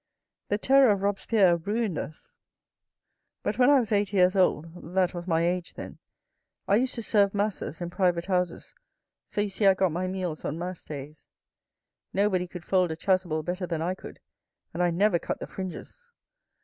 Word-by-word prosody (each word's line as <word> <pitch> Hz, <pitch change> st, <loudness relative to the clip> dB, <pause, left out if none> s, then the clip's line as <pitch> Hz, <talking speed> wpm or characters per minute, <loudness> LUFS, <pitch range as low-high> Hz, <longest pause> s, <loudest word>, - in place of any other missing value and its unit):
The 205 Hz, -, 0 dB
Terror 270 Hz, +3 st, +5 dB
of 200 Hz, -2 st, +1 dB
Robespierre 200 Hz, -2 st, +3 dB
ruined 205 Hz, +1 st, -2 dB
us, 155 Hz, -, -8 dB, 1.1 s
but 215 Hz, -, -2 dB
when 250 Hz, +2 st, +6 dB
I 285 Hz, -, +7 dB
was 230 Hz, -3 st, -2 dB
eight 205 Hz, -1 st, +1 dB
years 185 Hz, 0 st, +4 dB
old, 170 Hz, -1 st, 0 dB
that 185 Hz, -1 st, +2 dB
was 175 Hz, 0 st, -6 dB
my 165 Hz, -2 st, +2 dB
age 175 Hz, 0 st, -1 dB
then, -, -, -9 dB, 0.7 s
I 200 Hz, -, +4 dB
used 255 Hz, +2 st, 0 dB
to 230 Hz, -, -4 dB
serve 205 Hz, -2 st, +2 dB
masses 200 Hz, -5 st, -2 dB
in 175 Hz, 0 st, -4 dB
private 175 Hz, -2 st, +1 dB
houses, 180 Hz, -2 st, -2 dB, 0.5 s
so 205 Hz, -, -2 dB
you 205 Hz, -, -1 dB
see 200 Hz, +1 st, +2 dB
I 190 Hz, -, +6 dB
got 190 Hz, -2 st, +1 dB
my 180 Hz, +3 st, -2 dB
meals 185 Hz, -4 st, -4 dB
on 150 Hz, -, -3 dB
mass 180 Hz, +1 st, -5 dB
days. 145 Hz, +1 st, -9 dB, 0.9 s
Nobody 190 Hz, -2 st, +1 dB
could 175 Hz, -1 st, -9 dB
fold 185 Hz, -2 st, +2 dB
a 160 Hz, -, -3 dB
chasuble 175 Hz, -3 st, 0 dB
better 180 Hz, +2 st, -3 dB
than 165 Hz, -2 st, -2 dB
I 180 Hz, +2 st, 0 dB
could, 185 Hz, -, -11 dB, 0.5 s
and 170 Hz, -, -2 dB
I 175 Hz, -, +3 dB
never 175 Hz, +1 st, +2 dB
cut -, -, -4 dB
the -, -, -5 dB
fringes. 190 Hz, -, -8 dB
185 Hz, 185 wpm, -27 LUFS, 175-205 Hz, 1.1 s, I